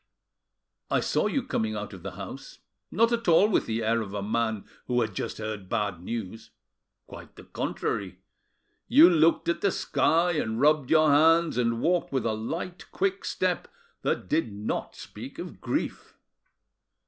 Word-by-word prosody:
I - - +2
saw - - +1
you - - -1
coming 110 -1 -2
out 105 0 -5
of 95 - -10
the 100 +1 -7
house, - - -9 0.3
not 230 +2 +2
at 235 -3 -1
all 170 +4 +6
with 215 - +1
the 115 0 -1
air 115 +1 +1
of 105 -2 -6
a 100 - -3
man 110 0 -1 0.2
who 125 -1 +1
had 110 -3 -2
just - - -4
heard 110 -3 -6
bad 105 -6 -1
news, 110 +1 -6 0.6
(quite - - -12
the - - -12
contrary) 95 -3 -3 0.7
you 165 - +8
looked 165 -2 +3
at 170 - 0
the 200 - +3
sky, 170 +1 +2
and 110 -9 -2
rubbed 150 -1 +3
your 155 -2 +5
hands, 165 +2 +4
and 115 -1 0
walked 175 +1 +1
with 130 -4 -1
a 110 - +1
light, 165 +11 -5
quick 385 0 -1
step, - - -1 0.3
that - - -1
did 160 -9 0
not 105 +1 -4
speak - - -10
of - - -8
grief." - - -3
115 Hz, 170 wpm, -27 LUFS, 110-165 Hz, 0.7 s, you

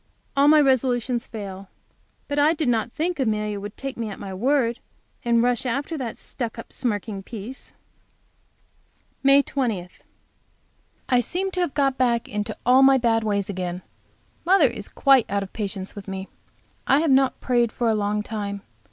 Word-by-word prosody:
All 280 +1 +4
my 305 +1 +7
resolutions 255 -3 +1
fail. 195 -3 -8 0.6
But 285 0 -1
I 305 +3 +4
did 305 -3 -1
not 235 -1 +1
think 335 +3 -2
Amelia 210 -4 -1
would 205 +1 -8
take 270 -1 -5
me 230 -2 -3
at 200 - -7
my 195 -1 -7
word, 240 +3 +1 0.4
and 235 -1 +3
rush 245 -1 +1
after 275 +6 -2
that 250 -6 -5
stuck 235 -4 -5
up, 230 - -9
smirking 210 -4 -2
piece. 225 +5 -8 1.5
May 275 +1 +6
20. 225 -12 -2 1.2
I 250 - +3
seem 365 - -1
to 365 - -3
have 350 -6 -1
got 275 -2 +1
back 235 -2 +2
into 210 0 -4
all 255 +2 +6
my 270 0 +7
bad 230 -2 +2
ways 200 -2 0
again. 180 -2 -4 0.6
Mother 370 -3 +5
is 210 -4 -8
quite 270 -4 +4
out 200 0 0
of 190 - -11
patience 200 -3 -4
with 205 -1 -9
me. 190 0 -5 0.6
I 275 +3 +4
have 320 -3 +2
not 265 0 +3
prayed 240 -3 +1
for 240 - -1
a 225 - +3
long 210 0 0
time. 205 -2 -5
235 Hz, 170 wpm, -24 LUFS, 205-270 Hz, 1.5 s, my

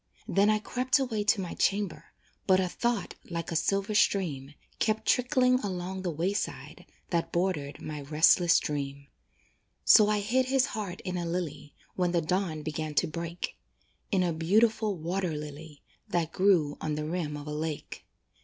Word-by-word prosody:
Then 200 +2 +3
I 215 - +4
crept 250 +5 +1
away 240 -6 -1
to 210 -1 +3
my 180 - -5
chamber, 200 -2 0 0.4
But 185 -1 +5
a 185 - +1
thought, 235 +3 -1 0.2
like 170 -1 -4
a - - -2
silver 195 +5 0
stream, 155 -10 +1 0.2
Kept 220 0 0
trickling 250 0 +3
along 190 -3 -4
the 185 - -2
wayside 175 +6 -3 0.2
That 170 -2 0
bordered 170 -6 -1
my 150 -1 -6
restless 160 +4 +4
dream. 140 -1 -4 0.8
So 210 -1 +7
I 210 -1 +1
hid 255 +5 +1
this 265 -1 +3
heart 205 -8 -5
in 185 -1 -3
a 175 - -2
lily, 155 -4 -4 0.2
When 180 -1 0
the 170 - +2
dawn 170 -2 -1
began 155 0 -4
to 175 - +3
break 170 +1 -5 0.5
In 190 -2 +3
a 175 -2 0
beautiful 210 +5 +2
water 175 +2 -2
lily, 150 0 -9 0.3
That 165 -2 0
grew 175 -7 +2
on 155 -1 -1
the 150 0 -3
rim 155 -2 -3
of 145 - -8
a 150 - -5
lake. 155 0 -5
175 Hz, 165 wpm, -29 LUFS, 155-205 Hz, 0.8 s, So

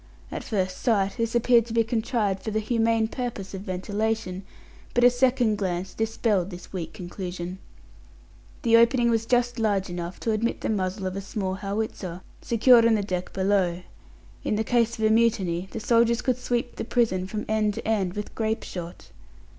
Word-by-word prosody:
At - - -4
first 185 -4 -1
sight 200 -3 +1
this 230 0 -1
appeared 235 -1 +4
to 225 - -6
be 230 0 +4
contrived 220 -4 -1
for - - -4
the 215 0 0
humane 225 0 +1
purpose 225 -5 -5
of 190 - -5
ventilation, 200 0 -2 0.5
but 245 - +3
a 245 - +8
second 245 -4 +2
glance 185 -1 -2
dispelled 220 -4 0
this 180 0 -10
weak 165 -3 -4
conclusion. 180 0 -6 1.0
The 230 -2 +6
opening 235 +1 +4
was 225 0 0
just 245 0 +1
large 200 -4 0
enough 175 +1 -5
to 225 - 0
admit 220 +2 -1
the - - -2
muzzle 190 -2 -1
of 185 0 -3
a 195 - -3
small 195 -1 -3
howitzer, 195 -2 -4 0.2
secured 235 0 +5
on 225 - +4
the 210 - 0
deck 185 -2 -3
below. 190 -2 +1 0.6
In 210 - 0
case 235 -1 +1
of 220 - 0
a 215 - +4
mutiny, 195 -6 +2
the 225 - -5
soldiers 235 +1 +3
could 255 -1 +1
sweep 240 -1 -2
the - - -2
prison 225 -6 +1
from 210 +2 -4
end 215 -1 +1
to - - -6
end 200 -5 +1
with 210 0 -5
grape 220 0 -1
shot. 175 -1 -8
215 Hz, 180 wpm, -26 LUFS, 190-230 Hz, 1.0 s, a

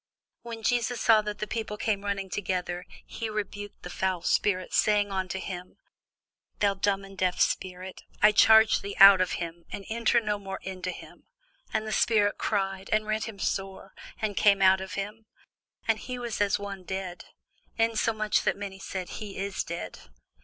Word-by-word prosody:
When 230 -1 -8
Jesus 245 0 +1
saw 220 -2 +5
that 210 0 -5
the 215 - -3
people 215 -1 -4
came 205 -2 -1
running 195 -2 -3
together, 180 -2 -3 0.2
he 225 - -5
rebuked 205 -1 -5
the 180 - -6
foul 185 -2 -1
spirit, 185 -3 +1
saying 205 -1 +3
unto 190 -1 -2
him, 180 -1 -7 0.8
Thou 200 -1 +2
dumb 195 0 0
and 195 0 -13
deaf 185 -1 0
spirit, 185 0 -1 0.2
I 210 - +7
charge 220 +1 +6
thee, 200 0 -6
come 195 - +12
out 195 -2 +6
of 185 - 0
him, 170 0 -5
and 200 - -6
enter 235 +1 +2
no 210 -2 -2
more 195 -1 -6
into 185 -1 -5
him. - - -10 0.4
And 215 - -1
the 215 - -4
spirit 205 -1 +2
cried, 195 -2 -1
and 215 0 +2
rent 215 +1 -1
him 220 -3 -8
sore, 195 -1 -3 0.3
and 215 -2 -2
came 200 -1 +4
out 190 0 +5
of 190 -1 -6
him: 210 +3 -5 0.6
and 225 -1 +2
he 250 +2 -6
was 235 -4 -4
as 205 -1 +3
one 200 -2 -7
dead; 185 -1 -5 0.5
insomuch 225 -1 +1
that - - 0
many 195 -1 -6
said, 190 -1 -5
He 205 -2 -7
is 195 0 -2
dead. 170 +1 -6
200 Hz, 180 wpm, -28 LUFS, 190-215 Hz, 0.8 s, come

